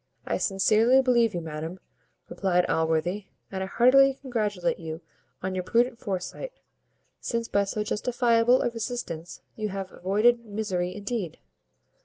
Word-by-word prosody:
"I - - -1
sincerely 220 +6 +4
believe 235 -5 +3
you, 175 - -2
madam," 160 +3 -6 0.5
replied 180 -2 +1
Allworthy, 160 +5 0 0.2
"and 190 -1 -3
I 190 - -2
heartily 265 +5 +5
congratulate 210 -9 -1
you 160 0 -6 0.4
on 185 0 -2
your 185 -1 -2
prudent 235 +4 +1
foresight, 200 - -4 0.7
since 230 -1 -2
by 200 -2 +1
so 210 +2 -2
justifiable 240 +2 +2
a 240 - 0
resistance 215 -8 -5
you 215 -1 -3
have 195 -1 -5
avoided 220 +6 +2
misery 195 -5 -3
indeed!" 205 -4 -4
205 Hz, 135 wpm, -27 LUFS, 180-235 Hz, 0.7 s, heartily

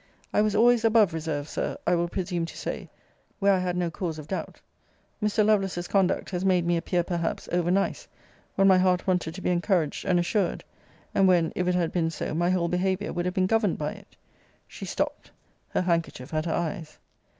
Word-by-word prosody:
I - - +4
was 210 -1 +1
always 235 +1 +5
above 220 -5 +4
reserve, 155 -3 -3
Sir, - - -3
I - - +3
will 170 0 +1
presume 175 -2 -2
to - - -10
say, - - -5 0.5
where 200 -1 +4
I 190 - +2
had 180 -1 -1
no 175 -2 -1
cause 165 -2 -4
of 150 -1 -9
doubt. 190 - -5 0.6
Mr. 210 0 +2
Lovelace's 195 -4 +1
conduct 195 -1 +1
has 180 0 -2
made 185 -3 +3
me 175 0 +2
appear, 175 +1 0
perhaps, 170 -1 -3
over 175 -1 +1
nice, 195 +2 0 0.5
when 195 - +4
my 190 -1 +6
heart 180 -1 +2
wanted 180 -3 0
to 190 - -7
be 180 - 0
encouraged 175 -3 0
and 180 - +3
assured! 180 +2 0 0.5
and 195 - +4
when, 175 -3 +3
if 180 - -1
it 180 - +2
had 170 -2 0
been 165 -2 0
so, 165 - -4
my 175 +2 +1
whole 180 -2 +1
behaviour 190 +3 -1
would 175 0 -2
have 180 +1 -2
been 185 -1 +2
governed 215 -1 +1
by 150 0 -2
it. - - -14 0.5
She - - -8
stopt; - - -3 0.4
her - - 0
handkerchief 165 -6 -2
at 155 +1 0
her - - -1
eyes. 170 -2 -3
180 Hz, 205 wpm, -26 LUFS, 170-195 Hz, 0.6 s, my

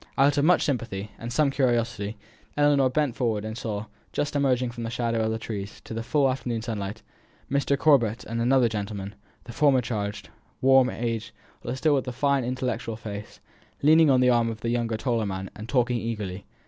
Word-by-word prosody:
Out 140 +1 +4
of 145 - +2
much 180 +2 +4
sympathy, 110 -7 -2
and 120 +1 -6
some 140 +3 +2
curiosity, 115 -5 0 0.4
Ellinor 145 -2 +4
bent 140 -2 0
forward, 110 -5 -1
and 110 0 -5
saw, 110 -3 -4 0.3
just 145 0 -2
emerging 130 -3 +1
from 120 0 -8
the 115 - -3
shadow 115 -1 -1
of 110 - 0
the 110 - -1
trees 105 -3 -6
on - - -17
to - - -8
the 115 - -3
full 140 +4 +2
afternoon 125 -3 -2
sunlit 105 -2 -4 0.5
pavement, 140 0 +2
Mr. 140 - +2
Corbet 125 -6 +3
and 115 +1 -3
another 125 0 +4
gentleman; 100 -2 -4 0.3
the 120 - -9
former 140 -2 +4
changed, 105 -4 -4 0.3
worn, 130 -1 +5
aged, 115 -3 -3 0.3
though - - -7
with 130 - -2
still 145 0 +3
the 125 - -5
same 120 - -13
fine 140 -1 +2
intellectual 125 -2 -2
face, 105 -2 -8 0.4
leaning 155 +1 +6
on 130 -2 +5
the 125 - +5
arm 120 -1 +3
of 110 -1 -6
the 115 - -2
younger 115 -2 0
taller 115 -3 0
man, 95 0 -5
and 110 +2 -9
talking 120 0 +2
eagerly. 105 -5 -5
120 Hz, 205 wpm, -26 LUFS, 110-130 Hz, 0.5 s, leaning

